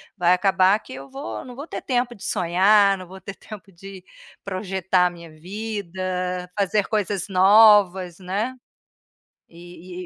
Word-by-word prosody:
vai 180 -2 +3
acabar 190 +1 +3
que 215 - -13
eu 135 +1 -10
vou 275 +2 -7
não 250 -2 -11
vou 285 - -7
ter - - -6
tempo 245 -1 -1
de 205 - -14
sonhar, 195 +3 +3
não 185 -1 -10
vou 190 +2 -12
ter 195 - -8
tempo 210 -2 -12
de 190 +1 -12 0.4
projetar 190 -2 0
a - - -2
minha 170 -2 -13
vida, 185 0 -5
fazer 200 +1 +1
coisas 205 -4 -2
novas, 190 -2 +5
né, 205 +8 -3 0.9
e 175 +1 -11
190 Hz, 150 wpm, -22 LUFS, 180-210 Hz, 0.9 s, novas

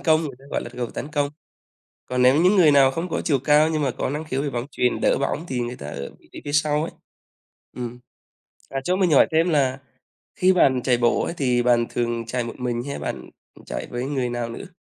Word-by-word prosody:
công, 160 -2 +3 0.2
ta 135 - -18
gọi - - -1
là - - -7
cầu 125 -1 -4
tấn - - -6
công. 145 -2 -1 0.8
Còn 125 0 0
nếu 130 +2 +6
những 185 +4 +4
người 165 -5 +6
nào 135 -2 +6
không 165 +6 -4
có - - -2
chiều 145 -5 +2
cao 150 +3 +4
nhưng 155 -1 0
mà 135 - +1
có 125 - -3
năng 150 +2 -3
khiếu 135 -2 -2
về 145 - -2
bóng 120 -1 -3
chuyền, 125 -2 0
đỡ - - +2
bóng 140 +3 -2
thì 125 -2 -2
người 120 +1 -4
ta 70 - -8
ở 70 -1 -6
vị - - -24
trí - - -8
phía 145 - -4
sau 150 0 +2
ấy. 165 - -3 0.9
Ừm. 120 0 -5 0.7
À, 135 - -2
cho 180 +6 +1
mình 185 -3 +2
hỏi 140 - +6
thêm 165 +2 +3
là 135 -4 +1 0.6
khi 185 -3 +4
bạn 130 -8 +3
chạy 125 -2 +3
bộ 120 0 +2
ấy - - -3
thì 125 -3 +1
bạn 120 -1 +3
thường 120 -1 -2
chạy 120 +1 -2
một 115 - -6
mình 120 -1 -2
hay 140 +1 -5
là - - -6
bạn, - - -5 0.3
ừm, - - -17
chạy - - -5
với 120 +1 -3
người 135 -3 -1
nào 120 -1 -3
nữa? 145 +11 -8
135 Hz, 250 wpm, -23 LUFS, 120-150 Hz, 0.9 s, nếu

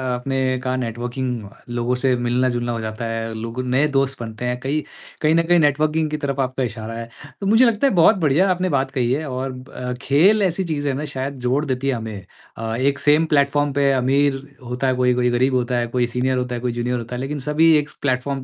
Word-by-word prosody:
आपने 130 0 -1
कहा, 130 0 -1
नेटवर्किंग, 120 -1 -3 0.2
लोगों 120 +1 -1
से 130 -1 +2
मिलना-जुलना 120 0 0
हो 115 - -3
जाता 110 +1 -4
है। 115 0 -3
लोग 115 +2 -5
नए 135 +4 +3
दोस्त 135 -2 0
बनते 110 +1 -6
हैं 125 0 -1
कई, 140 +4 -1
कई - - -17 0.4
कहीं 155 +1 +3
न 165 - +3
कहीं 175 -1 +5
नेटवर्किंग 155 +1 +2
की 155 - -1
तरफ 140 -2 -3
आपका 130 0 -1
इशारा 110 -1 -5
है, 115 0 -6 0.3
तो - - -3
मुझे 225 +5 +6
लगता 230 +4 +3
है - - +1
बहुत 180 +5 +6
बढ़िया 165 +4 +3
आपने 185 0 0
बात 135 -2 0
कही 125 -3 0
है 155 +3 -2
और 130 +1 -3
ब 130 0 -11
अ, 125 0 -5
खेल 190 +10 +4
ऐसी 185 +1 0
चीज़ 145 -4 -2
है 135 - +1
ना, 145 +3 -3
शायद 140 0 -4
जोड़ 140 +5 +1
देती 130 0 -2
है 135 - +2
हमें। 110 -4 -6 0.3
अ, 115 0 -3
एक 140 +3 +1
सेम 150 +2 +4
प्लेटफ़ॉर्म 145 -1 +2
पे 140 -1 +3
अमीर 135 +1 +2 0.2
होता 125 +2 -2
है 130 - +2
कोई, 125 0 +3
कोई 125 0 +1
गरीब 130 +2 +2
होता 125 0 0
है, 120 -1 0
कोई 120 0 0
सीनियर 125 +1 0
होता 125 -1 -2
है, 120 - -5
कोई 125 -1 -1
जूनियर 120 +1 -2
होता 120 +2 -6
है, 125 - -4
लेकिन 145 +2 -3
सभी 160 +2 +5
एक 150 0 -1
प्लेटफ़ॉर्म 135 0 -1
130 Hz, 240 wpm, -21 LUFS, 125-145 Hz, 0.4 s, मुझे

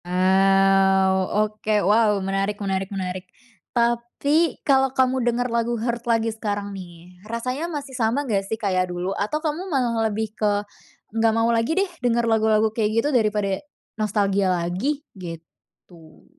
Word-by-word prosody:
Wow, 190 +1 +3 0.2
oke, 215 0 -3
wow, 210 +1 +4
menarik 195 +1 -1
menarik 195 -1 -2
menarik. 185 -2 -5 0.4
Tapi 240 +7 +1
kalo 270 -2 +4
kamu 260 0 +2
denger 240 +1 0
lagu 235 0 0
"Hurt" 235 +1 -3
lagi 225 -1 +1
sekarang 205 -2 -4
nih, 180 -1 -12
rasanya 255 +8 -3
masih 285 -4 -6
sama 250 +3 0
gak 210 -6 +1
sih 220 - -2
kayak 185 -4 0
dulu? 180 +2 -3
Atau 210 +11 -1
kamu 325 +5 -2
malah 235 -6 +1
lebih 215 0 -3
ke, 205 -1 0 0.5
"Nggak 225 0 +2
mau 230 +1 +2
lagi 230 +4 +1
deh 390 0 +2
denger 235 -1 +1
lagu-lagu 220 -1 +2
kayak 220 -2 0
gitu 260 +6 +2
daripada, 210 -4 +1 0.3
nostalgia 200 -2 +1
lagi" 185 - -1
gitu. 165 -2 -13
215 Hz, 145 wpm, -23 LUFS, 195-235 Hz, 0.5 s, wow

